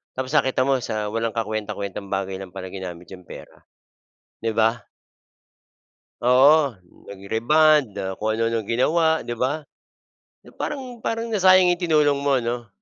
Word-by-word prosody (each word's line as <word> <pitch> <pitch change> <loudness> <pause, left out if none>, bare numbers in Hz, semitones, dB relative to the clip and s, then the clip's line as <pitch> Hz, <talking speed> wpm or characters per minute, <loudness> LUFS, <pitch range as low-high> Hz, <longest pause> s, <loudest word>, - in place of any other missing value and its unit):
Tapos 130 +1 -4
nakita 130 -3 +2
mo 135 -1 +2
sa 105 -1 -3
walang 115 0 -2
kakuwentang-kuwentang 105 -3 -4
bagay 95 0 -2
lang 95 -2 -9
pala 95 -1 -6
ginamit 90 -2 -8
yung 90 -1 -11
pera, - - -12 0.8
'di 115 0 -2
ba? 115 +1 +1 1.4
Oo, 135 +2 +5 0.3
nag-rebond, 115 +6 +2
ah, 95 -1 -3
kung 110 +1 -1
ano-ano 115 0 0
ginawa, 160 +7 +2
'di 120 -1 -6
ba? 145 +5 -1 0.8
Na - - -16
parang 260 -5 -6
parang 230 +1 -2
nasayang 185 -2 +5
'yung 175 - -4
tinulong 150 -5 +2
mo, 140 -1 +2
'no? 120 -2 -3
120 Hz, 140 wpm, -23 LUFS, 105-150 Hz, 1.4 s, Oo